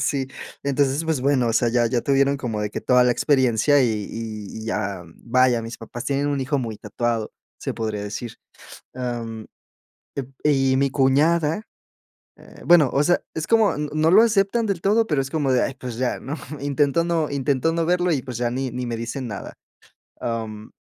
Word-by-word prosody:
sí, 135 -2 0 0.4
entonces, 140 +2 +1
pues, 160 -4 0
bueno, 135 -2 +2
o - - +1
sea, 120 +1 +2
ya 120 0 +2
ya 120 +1 0
tuvieron 140 +1 +2
como 120 -6 -3
de 105 0 -2
que - - -4
toda 125 -1 +4
la 125 - +4
experiencia, 130 +1 +3
y - - +3 0.2
y 110 -2 -6 0.2
y - - -8
ya 95 -4 -3 0.2
vaya, 125 -1 +3
mis 115 +1 -7
papás 120 +2 -8
tienen 140 +1 0
un 145 -1 0
hijo 135 +2 0
muy 115 -4 -4
tatuado. 115 +1 -2 0.3
Se - - -3
podría 110 -2 -3
decir, 105 +3 -6 0.6
am, 115 -3 -5 0.7
ep 135 -2 -4 0.2
y 135 -3 +3
mi 140 +1 +2
cuñada 150 +7 +2 0.8
eh, - - -15
bueno, 170 -5 +6
o 140 - +3
sea, 175 +4 +3
es 160 - -3
como 225 -2 +3
no 155 +2 +1
lo 205 +5 +7
aceptan 220 0 +2
del 200 -5 -1
todo, 215 +5 +3
pero 150 -7 +1
es 135 0 -3
como 145 -4 0
de: 125 - +3
"!Ay, 135 - -1
pues, 125 -2 -7
ya!", 125 0 -1
¿no? 145 +3 -5 0.2
Intentó 145 +3 +1
no 165 -3 0
intentó 140 +2 0
no 165 0 0
verlo, 180 0 +2
y 140 -5 0
pues, 125 -3 -6
ya 120 -1 0
ni 130 +1 -2
ni 125 +1 -4
me 120 -1 -3
dicen 115 +3 -4
nada. 100 -4 -7 0.7
Am, 110 -2 -4
135 Hz, 195 wpm, -23 LUFS, 120-150 Hz, 0.8 s, lo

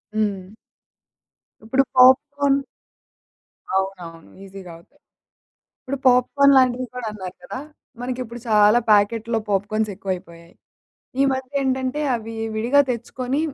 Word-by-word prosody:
హ్మ్. 200 -3 -2 1.1
ఇప్పుడు 260 +5 +2
పాప్‌కార్న్ 275 +2 +4 1.1
అవునవును. 180 -4 -4
ఈజీ‌గా 195 -2 -11
అవుతయి. 170 - -24 0.8
ఇప్పుడు 275 +1 -5
పాప్‌కార్న్ 265 +3 +4
లాంటివి 255 0 +2
కూడా 250 -2 -5
అన్నారు 190 -3 -8
కదా! 260 - -6 0.4
మనకిప్పుడు 245 -1 -5
చాలా 210 +1 +5
ప్యాకెట్‌లో 225 +2 +2
పాప్‌కార్న్స్ 210 +2 0
ఎక్కువయిపోయాయి. 175 -3 -7 0.7
ఈ - - +6
మధ్య 260 0 -5
ఏంటంటే 260 +2 -1 0.2
అవి 225 0 -8 0.2
విడిగా 245 +6 +3
తెచ్చుకొని 250 +3 -3
230 Hz, 100 wpm, -22 LUFS, 195-255 Hz, 1.1 s, ఈ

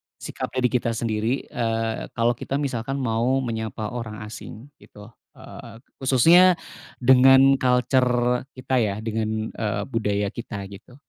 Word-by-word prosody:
sikap, - - -6
eee, 130 - -1
di 125 - +3
kita 115 -2 -1
sendiri, 115 +2 -1
eee, 115 -1 -3
kalo 115 +1 +2
kita 120 +3 -5
misalkan 135 -2 -2
mau 125 +3 0
menyapa 110 -2 -4
orang 110 -3 -6
asing, 110 +4 -10
gitu? 105 +2 -15 0.2
Eee, 115 +2 -12 0.2
khususnya 165 +8 +5 0.5
dengan 135 +2 +6
culture 125 0 +1
kita 130 0 -1
ya, 105 -3 0
dengan, 110 0 -3
eee, 105 -2 -3
budaya 105 -3 -1
kita, 110 -4 -7
gitu. 100 +5 -13
120 Hz, 135 wpm, -23 LUFS, 110-130 Hz, 0.5 s, dengan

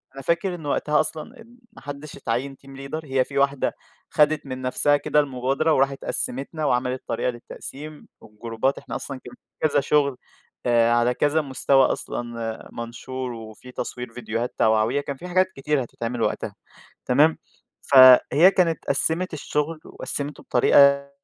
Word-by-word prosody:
أنا 135 - -7
فاكر 170 +5 0
إن 160 -4 -10
وقتها 150 +1 +1
أصلًا 155 +7 -3 0.3
ما - - -14
حدِّش 145 +1 -8
اتعيّن 130 +4 -3
team - - -13
leader 140 +3 -6
هي 135 -2 +1
في 140 - -7
واحدة 140 -1 +1 0.4
خَدِت 150 -1 +2
من 130 -1 -6
نَفسها 135 +3 +2
كده 150 - +1
المبادرة 140 +3 0
وراحت 135 0 0
قسّمتَنا 140 +5 -1
وعملت 125 -1 0
طريقة 115 +2 -1
للتقسيم 145 +5 -9
والجروبات، 115 +4 -3
إحنا - - -7
أصلًا 135 -2 -6
كن - - -12 0.4
كذا 145 - +2
شغل 140 -1 +1 0.5
آآ، 120 -1 +3
على 120 +1 +2
كذا 150 +4 +1
مستوى 135 -1 +2
أصلًا 115 -2 -4
منشور 125 +2 -6
وفي 115 +2 -11
تصوير 125 -1 -6
فيديوهات 120 0 -4
توعوية 110 +5 +2
كان 140 -1 -5
في 180 - -9
حاجات 185 +1 +2
كتيرة 140 0 0
هتتعمل 120 0 -5
وقتها، - - -2 0.5
تمام، 150 +5 +3 0.5
فهي 135 +6 +8
كانت 165 -4 +1
قسّمت 160 +6 +1
الشغل 155 +1 -3
وقسّمته 145 +1 -5
بطريقة 140 +3 +4
135 Hz, 145 wpm, -23 LUFS, 125-150 Hz, 0.5 s, فهي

